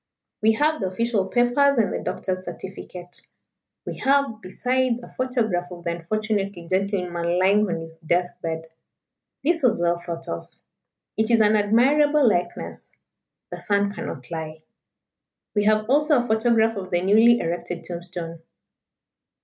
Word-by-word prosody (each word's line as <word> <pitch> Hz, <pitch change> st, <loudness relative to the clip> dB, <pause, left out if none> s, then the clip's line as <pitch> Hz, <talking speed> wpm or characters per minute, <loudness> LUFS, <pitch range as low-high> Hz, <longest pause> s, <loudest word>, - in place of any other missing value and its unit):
We 220 Hz, +1 st, +4 dB
have 300 Hz, +3 st, +1 dB
the 190 Hz, -, 0 dB
official 205 Hz, +1 st, 0 dB
papers, 245 Hz, +5 st, +3 dB
and 220 Hz, -3 st, +2 dB
the -, -, -2 dB
doctor's 185 Hz, -1 st, -3 dB
certificate. 180 Hz, -2 st, -7 dB, 0.6 s
We -, -, -6 dB
have, 275 Hz, -5 st, +1 dB
besides, 250 Hz, +5 st, 0 dB
a -, -, -13 dB
photograph 225 Hz, -9 st, -1 dB
of 175 Hz, -1 st, -10 dB
the 170 Hz, -, -1 dB
unfortunate 200 Hz, +3 st, -2 dB, 0.2 s
gentleman 180 Hz, -3 st, 0 dB
lying 200 Hz, +3 st, +3 dB
on 165 Hz, -1 st, -2 dB
his 165 Hz, 0 st, -10 dB
death 175 Hz, +2 st, 0 dB
bed 160 Hz, -1 st, -3 dB, 0.8 s
this 330 Hz, +3 st, +2 dB
was 250 Hz, -8 st, +3 dB
well 170 Hz, 0 st, +1 dB
thought 170 Hz, -1 st, -6 dB
of: 85 Hz, -, -5 dB, 0.7 s
it 220 Hz, +1 st, +1 dB
is 230 Hz, -1 st, +4 dB
an 215 Hz, 0 st, +4 dB
admirable 270 Hz, +7 st, +4 dB
likeness 180 Hz, -5 st, -2 dB, 0.5 s
the -, -, -6 dB
sun 200 Hz, 0 st, +1 dB
cannot 200 Hz, -, -7 dB
lie 160 Hz, -1 st, -6 dB, 0.9 s
we 205 Hz, -1 st, +1 dB
have 215 Hz, 0 st, +3 dB
also 295 Hz, +3 st, +4 dB
a 245 Hz, -, +1 dB
photograph 225 Hz, 0 st, +3 dB
of 185 Hz, -2 st, -5 dB
the 175 Hz, -1 st, 0 dB
newly 225 Hz, +5 st, +6 dB
erected 170 Hz, +1 st, -3 dB
tombstone. 175 Hz, -1 st, -6 dB
205 Hz, 145 wpm, -24 LUFS, 175-235 Hz, 0.9 s, newly